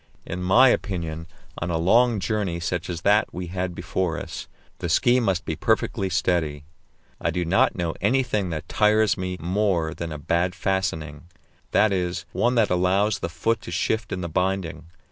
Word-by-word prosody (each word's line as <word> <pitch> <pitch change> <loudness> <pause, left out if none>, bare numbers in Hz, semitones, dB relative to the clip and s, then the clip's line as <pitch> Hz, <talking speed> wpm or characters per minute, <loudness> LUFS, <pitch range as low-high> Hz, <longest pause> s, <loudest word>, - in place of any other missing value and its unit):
In 90 +1 -5
my 115 +9 +6
opinion, 85 -7 -2 0.3
on 85 - -3
a 85 - 0
long 115 +7 +4
journey 100 -5 -1
such 90 +2 -3
as 85 -2 -4
that 105 +3 +3
we 90 0 -5
had 90 -1 -2
before 85 0 -2
us, - - -7 0.3
the 85 - -3
ski 120 +8 +4
must 95 -5 0
be 80 - -2
perfectly 95 +4 0
steady. 80 -5 0 0.6
I - - +1
do 90 -1 -1
not 90 +4 +3
know 85 -3 -2
anything 105 -3 +1
that 80 -2 -5
tires 105 -2 +3
me 90 0 -4
more 90 -2 0
than 85 -1 -5
a 75 - -4
bad 85 +4 0
fastening 80 -6 -2 0.4
that 110 0 +3
is, 90 -1 -2
one 120 +1 +1
that 110 -5 +3
allows 95 +4 +2
the - - -3
foot 110 +7 -1
to - - -9
shift 110 0 -1
in 90 - -3
the 85 - -3
binding. 90 -1 -2
90 Hz, 180 wpm, -24 LUFS, 85-105 Hz, 0.6 s, my